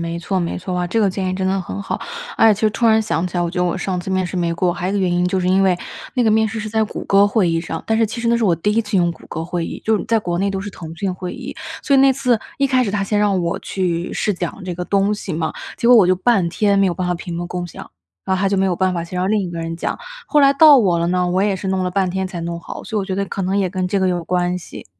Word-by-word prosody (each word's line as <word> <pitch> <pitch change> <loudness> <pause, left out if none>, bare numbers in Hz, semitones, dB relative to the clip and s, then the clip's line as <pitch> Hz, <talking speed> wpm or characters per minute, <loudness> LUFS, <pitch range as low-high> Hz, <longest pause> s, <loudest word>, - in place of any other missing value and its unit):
没 170 0 -3
错 190 +3 -2
没 170 -2 -2
错 180 0 -4
啊， 180 - -1
这 225 +6 0
个 200 -2 +3
建 190 0 -2
议 185 - -1
真 190 0 -1
的 190 +1 +1
很 195 +2 -6
好。 - - -4 0.4
而 225 - +6
且 - - +1
其 200 - -9
实 215 - +3
突 230 +2 0
然 220 0 +4
想 170 -4 -1
起 180 0 -6
来， 175 - +1
我 170 - -1
觉 180 - -4
得 - - +2
我 175 - 0
上 185 -2 -2
次 175 - -8
面 185 -1 +1
试 180 - -5
没 170 -1 0
过， 175 +1 +1
还 175 +1 -4
有 - - -1
一 - - -2
个 - - +1
原 185 -2 +1
因 175 0 +2
就 185 +1 0
是 180 - 0
因 190 +1 +4
为 185 -2 +3 0.4
那 250 - +2
个 220 - +3
面 220 0 +3
试 220 0 -4
是 215 - -4
在 220 0 +1
谷 210 - -7
歌 200 +1 +5
会 205 -3 +2
议 165 0 0
上。 165 -1 -5
但 220 0 +1
是 225 - +3
其 235 +3 -6
实 235 - 0
那 235 - +3
是 235 - 0
我 180 -5 +4
第 205 +6 0
一 230 - +2
次 205 -2 -2
用 175 -2 +3
谷 165 - -12
歌 160 - -5
会 175 -1 -3
议， - - -7
就 220 -1 +2
是 - - -5
在 225 -1 +2
国 175 -4 -2
内 200 +2 +1
都 195 -1 -3
是 205 +1 -6
腾 165 -4 -9
讯 190 +2 -2
会 180 0 -6
议。 - - -7 0.3
所 280 - +2
以 - - +6
那 270 0 +6
次 250 -3 +1 0.2
一 275 - +3
开 255 -2 +2
始 205 - -2
他 200 0 -1
先 205 +1 0
让 200 -3 +2
我 170 0 -1
去 175 -2 -2
试 210 - 0
讲 180 +1 -5
这 180 - -3
个 180 - -4
东 200 +2 +1
西 205 -2 -6
嘛， 160 0 -2 0.2
结 235 - +1
果 245 - +8
我 200 -5 +6
就 185 - +4
半 185 -1 +2
天 200 +3 +1
没 195 - +4
有 175 - 0
办 180 +1 -2
法 180 - +1
屏 175 0 -6
幕 175 - -3
共 180 0 -4
享， 175 - -10 0.4
然 190 - +1
后 - - -3
他 195 - +2
就 200 - 0
没 190 - +2
有 180 -2 0
办 185 0 +1
法， 170 - -2
先 180 +2 -6
让 185 - 0
另 210 0 +2
一 180 - -4
个 170 - -6
人 165 0 -4
讲。 - - -3 0.3
后 300 - +3
来 275 -1 +6
到 290 0 +8
我 185 -7 +2
了 170 - 0
呢， 180 0 +1
我 185 +2 +1
也 200 -2 +1
是 190 - -6
弄 190 -1 0
了 180 - -1
半 190 0 +1
天 190 +1 -2
才 180 -2 -6
弄 170 0 -4
好， - - -8
所 220 - -4
以 - - +2
我 - - -3
觉 190 - -3
得 200 - 0
可 195 - -4
能 190 +2 0
也 190 -2 +1
跟 185 0 -2
这 200 - 0
个 190 - +1
有 175 -1 -1
关 180 0 0
系。 180 - -9
190 Hz, 375 characters per minute, -19 LUFS, 175-210 Hz, 0.4 s, 果